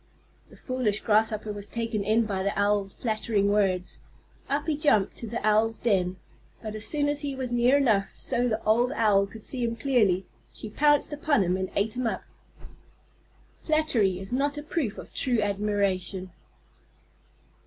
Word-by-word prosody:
The - - -16
foolish 250 -6 0
Grasshopper 215 0 +1
was 205 0 -7
taken 230 -3 -2
in 220 +3 +2
by 195 -3 -2
the 200 +1 -1
Owl's 205 -1 +1
flattering 215 -3 0
words. 190 -3 0 0.5
Up 285 +1 0
he 315 -2 0
jumped 285 - +2
to 230 - -6
the 235 +2 -3
Owl's 220 +1 +3
den, 185 -5 0 0.4
but 215 -2 -6
as 215 0 -3
soon 290 -1 0
as 290 0 0
he 280 -2 -3
was 260 -2 -4
near 240 +3 +4
enough 220 -8 +2
so 245 +1 0
the 220 -1 -2
old 235 +4 +3
Owl 200 -3 +3
could 220 +1 -12
see 255 -2 -4
him 230 0 -1
clearly, 215 -8 +2 0.3
she 215 - -8
pounced 295 +3 +3
upon 295 -6 +2
him 180 0 +1
and 190 0 -2
ate 215 +3 0
him 250 -1 -1
up. - - -3 1.4
_Flattery 240 - +1
is 195 +4 -6
not 285 +3 0
a 295 - -5
proof 290 -8 -2
of - - -10
true 245 -4 0
admiration. 200 -3 -1
220 Hz, 170 wpm, -27 LUFS, 200-255 Hz, 1.4 s, near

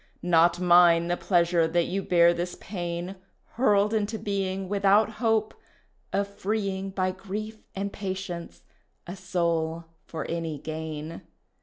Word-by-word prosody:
Not 175 0 +4
mine 175 -1 +5
the 175 - +2
pleasure 170 -2 +2
that 170 +1 +1
you 195 +2 -2
bear 170 -2 +4
this 175 +1 -4
pain, 175 -1 -5 0.3
Hurled 210 -3 +2
into 220 0 0
being 195 -2 -2
Without 200 +2 +3
hope 220 -2 +2 0.6
of 200 0 0
freeing 200 -1 -2
By 185 -1 -1
grief 215 +3 -6 0.2
and 200 +1 -3
patience 190 -3 -5 0.4
a 175 - -7
soul 170 -3 -1 0.2
for 160 - -5
any 165 -2 -3
gain. 155 +1 -6
185 Hz, 130 wpm, -27 LUFS, 170-200 Hz, 0.6 s, mine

